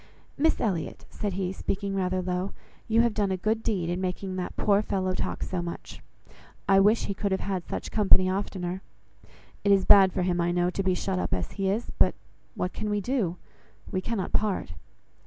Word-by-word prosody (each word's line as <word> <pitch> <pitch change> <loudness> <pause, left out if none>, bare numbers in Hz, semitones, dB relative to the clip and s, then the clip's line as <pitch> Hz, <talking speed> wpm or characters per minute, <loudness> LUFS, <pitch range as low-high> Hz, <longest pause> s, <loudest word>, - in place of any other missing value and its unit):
"Miss 320 +3 +2
Elliot," 185 -8 -2
said 205 -3 -3
he, 185 0 -2
speaking 195 +1 -3
rather 185 -1 0
low, 180 +1 -2 0.3
"you 225 +1 +4
have 235 -2 +2
done 205 -2 +1
a 190 - 0
good 220 +4 0
deed 200 -7 -1
in 175 +2 -2
making 185 +1 -3
that 180 -1 -4
poor 205 -1 +3
fellow 190 -3 -1
talk - - -3
so 180 -2 -2
much. 170 0 -7 0.7
I 195 0 +6
wish 210 +4 +4
he 200 - -2
could 200 +1 -2
have 190 -1 -1
such - - -4
company 190 -3 +5
oftener. 185 -1 -2 0.8
It 200 - +3
is 195 -1 +4
bad 195 -2 +8
for 185 - -1
him, 175 -1 +1
I 170 0 +1
know, 175 0 +1
to 195 - -2
be 185 -1 +1
shut 185 0 -1
up - - 0
as - - -4
he 195 -1 -1
is; 220 +5 -1
but - - +4 0.4
what 180 - -2
can 215 - -3
we 205 0 +1
do? 205 -6 -1 0.5
We 185 - -1
cannot 210 -3 -3
part." 200 - 0
190 Hz, 200 wpm, -27 LUFS, 185-205 Hz, 0.8 s, bad